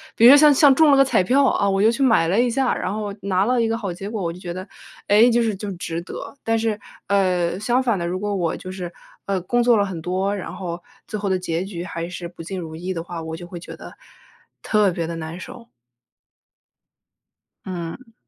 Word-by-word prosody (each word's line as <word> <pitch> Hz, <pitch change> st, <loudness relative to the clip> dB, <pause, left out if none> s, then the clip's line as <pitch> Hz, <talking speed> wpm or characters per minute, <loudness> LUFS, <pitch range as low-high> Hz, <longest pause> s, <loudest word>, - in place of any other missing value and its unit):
比 230 Hz, -, +5 dB
如 -, -, +11 dB
说 285 Hz, -, +9 dB
像 300 Hz, 0 st, +7 dB
像 280 Hz, 0 st, +6 dB
中 315 Hz, +3 st, +5 dB
了 280 Hz, -, +6 dB
个 275 Hz, -, +6 dB
彩 260 Hz, -, +3 dB
票， 270 Hz, +9 st, +3 dB
啊， 200 Hz, -5 st, +2 dB
我 195 Hz, 0 st, +1 dB
就 215 Hz, +3 st, +5 dB
去 250 Hz, +4 st, -4 dB
买 225 Hz, -11 st, +4 dB
了 195 Hz, +6 st, +2 dB
一 245 Hz, -, +2 dB
下， 260 Hz, +1 st, +1 dB
然 185 Hz, -, -3 dB
后 205 Hz, -1 st, -4 dB
拿 190 Hz, 0 st, +1 dB
了 245 Hz, +1 st, +2 dB
一 230 Hz, -, +2 dB
个 225 Hz, 0 st, -1 dB
好 200 Hz, -6 st, -4 dB
结 195 Hz, +4 st, -7 dB
果。 215 Hz, -4 st, -4 dB
我 170 Hz, -1 st, -2 dB
就 180 Hz, -, -12 dB
觉 175 Hz, -1 st, -6 dB
得： 185 Hz, +3 st, -6 dB, 0.4 s
“诶， 215 Hz, +4 st, +6 dB
就 235 Hz, 0 st, +3 dB
是 220 Hz, -3 st, 0 dB
就 200 Hz, +1 st, -5 dB
值 170 Hz, -1 st, -4 dB
得。” 175 Hz, -, -8 dB
但 225 Hz, 0 st, +1 dB
是， 220 Hz, -2 st, -1 dB, 0.3 s
呃， 185 Hz, -2 st, +1 dB
相 245 Hz, +4 st, +1 dB
反 230 Hz, -7 st, +1 dB
的， 170 Hz, -, -2 dB
如 180 Hz, +2 st, -2 dB
果 205 Hz, 0 st, -2 dB
我 170 Hz, -4 st, -1 dB
就 185 Hz, -, -8 dB
是， 180 Hz, -2 st, -6 dB, 0.4 s
呃， 195 Hz, -1 st, 0 dB
工 240 Hz, +7 st, +1 dB
作 240 Hz, -2 st, +4 dB
了 200 Hz, -, +2 dB
很 185 Hz, -4 st, -6 dB
多， 190 Hz, +4 st, -1 dB
然 195 Hz, -, -6 dB
后 175 Hz, -2 st, -5 dB, 0.3 s
最 215 Hz, -, -4 dB
后 200 Hz, -1 st, -2 dB
的 190 Hz, -, +2 dB
结 170 Hz, -1 st, -2 dB
局 185 Hz, -3 st, -6 dB
还 170 Hz, -1 st, -5 dB
是 175 Hz, -1 st, -6 dB
不 175 Hz, -1 st, -12 dB
尽 185 Hz, +3 st, -5 dB
如 160 Hz, -2 st, -7 dB
意 180 Hz, +3 st, -4 dB
的 165 Hz, -, -3 dB
话， 170 Hz, -1 st, -7 dB
我 160 Hz, 0 st, -6 dB
就 175 Hz, -, -9 dB
会 175 Hz, 0 st, -8 dB
觉 -, -, -10 dB
得 -, -, -11 dB, 0.7 s
特 210 Hz, -3 st, +3 dB
别 170 Hz, -1 st, -3 dB
地 165 Hz, +1 st, -5 dB
难 165 Hz, +2 st, -6 dB
受。 230 Hz, +4 st, -10 dB, 2.0 s
嗯。 185 Hz, +7 st, -7 dB
195 Hz, 265 characters per minute, -22 LUFS, 175-225 Hz, 2.0 s, 如